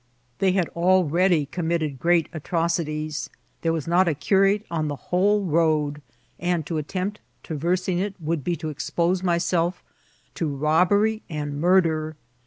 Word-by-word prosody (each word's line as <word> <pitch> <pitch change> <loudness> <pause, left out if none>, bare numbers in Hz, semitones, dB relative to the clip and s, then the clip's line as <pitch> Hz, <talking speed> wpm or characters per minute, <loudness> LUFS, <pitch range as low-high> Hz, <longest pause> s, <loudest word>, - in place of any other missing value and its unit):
They 190 -1 +3
had 185 -4 0
al 185 +2 +4
ready 170 0 +2
committed 160 -3 -2
great 170 +1 +3
atrocities; 155 -2 -2 0.3
there 165 - +1
was 160 -3 -2
not 175 +2 +3
a 160 - +1
cu 150 +7 0
rate 200 +2 +3
on 155 -2 -1
the 145 - -3
whcde 190 +5 +1
road; 150 -2 +1 0.4
and 175 -3 -1
to 160 -1 -2
attempt 185 +7 -3 0.2
traversing 175 +3 -1
it 200 +1 -2
would 160 -2 -2
be 175 - 0
to 155 -1 -5
expose 170 +4 -1
myself 175 0 0 0.5
to 165 - -2
robbery 180 +10 +2
and 145 -2 -4
murder. 160 -3 +2
170 Hz, 150 wpm, -24 LUFS, 155-185 Hz, 0.5 s, al